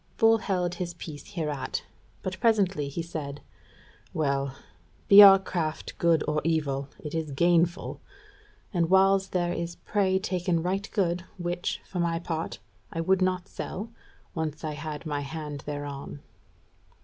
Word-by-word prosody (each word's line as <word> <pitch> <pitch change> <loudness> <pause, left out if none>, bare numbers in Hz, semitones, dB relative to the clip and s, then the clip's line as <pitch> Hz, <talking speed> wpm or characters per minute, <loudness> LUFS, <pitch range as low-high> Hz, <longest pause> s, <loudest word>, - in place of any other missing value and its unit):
Bull 225 0 +5
held 180 -4 -1
his 175 -1 -4
peace 155 +2 -9
hereat, 150 -6 -2 0.4
but 185 0 -4
presently 195 -10 +2
he 165 +4 -4
said: 145 -4 -5 0.8
"Well, 140 -3 0 0.5
be 200 +1 +11
our 195 -1 +11
craft 170 -5 -3
good 165 -2 +3
or 150 0 +1
evil, 140 -4 0
it 150 - -7
is 160 -2 -2
gainful; 170 +4 +1 0.7
and 170 -3 +1
whiles 195 0 +5
there 175 -1 0
is 170 0 -4
prey 190 -2 +1
taken 180 -3 0
right 190 +3 -1
good, 180 -3 0
which, 175 0 -2
for 180 - -5
my 170 -1 +1
part, 165 -1 -3 0.3
I 165 - -4
would 185 +3 +2
not 185 0 +1
sell, 215 +5 -6 0.4
once 155 -1 -3
I 155 - -2
had 150 +1 -6
my 145 -2 -2
hand 150 0 -5
thereon." 145 -1 -5
170 Hz, 145 wpm, -27 LUFS, 150-185 Hz, 0.8 s, be